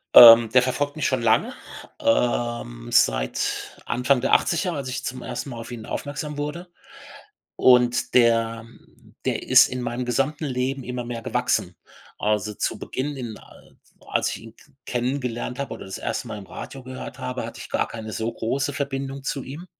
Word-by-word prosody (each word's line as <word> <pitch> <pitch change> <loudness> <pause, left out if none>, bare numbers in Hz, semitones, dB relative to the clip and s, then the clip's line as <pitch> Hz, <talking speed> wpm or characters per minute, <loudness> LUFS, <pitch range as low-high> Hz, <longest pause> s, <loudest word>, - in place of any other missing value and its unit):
Ähm, 115 -1 +11
der 125 - +5
verfolgt 145 +3 -1
mich 155 - -2
schon 130 -2 0
lange, 110 -1 +3 0.5
ähm, 120 - 0
seit - - +1
Anfang 125 +1 +2
der - - 0
80er, 180 +1 +3
als 140 -4 -4
ich 130 - -4
zum 130 0 -4
ersten 125 +3 -5
Mal 120 - -7
auf 115 +2 -8
ihn 115 -2 -7
aufmerksam 145 +1 -5
wurde. 150 +5 -4 0.9
Und 125 -1 +4
der 115 -2 +3 0.6
der - - -1
ist - - +7
in 125 0 -4
meinem 120 +1 -3
gesamten 135 +5 0
Leben 130 0 -2
immer 125 0 -4
mehr 120 -1 -5
gewachsen. - - 0 0.4
Also, 105 0 0
zu - - -2
Beginn 145 +3 -4
in 120 -4 -6
al - - -18 0.3
als - - +1
ich - - -5
ihn 115 0 -13
k 145 - -22
kennengelernt 125 -1 -2
habe 140 - -3
oder - - -9
das 95 - -6
erste - - -3
Mal 105 - -5
im 100 - -9
Radio 135 +6 -8
gehört 130 0 -8
habe, 130 0 -3
hatte - - -9
ich - - -9
gar - - 0
keine 110 -1 -7
so 110 +2 -2
große 135 +6 -2
Verbindung 135 0 -4
zu 135 -1 -3
ihm. 150 +7 -8
125 Hz, 180 wpm, -24 LUFS, 115-135 Hz, 0.9 s, Ähm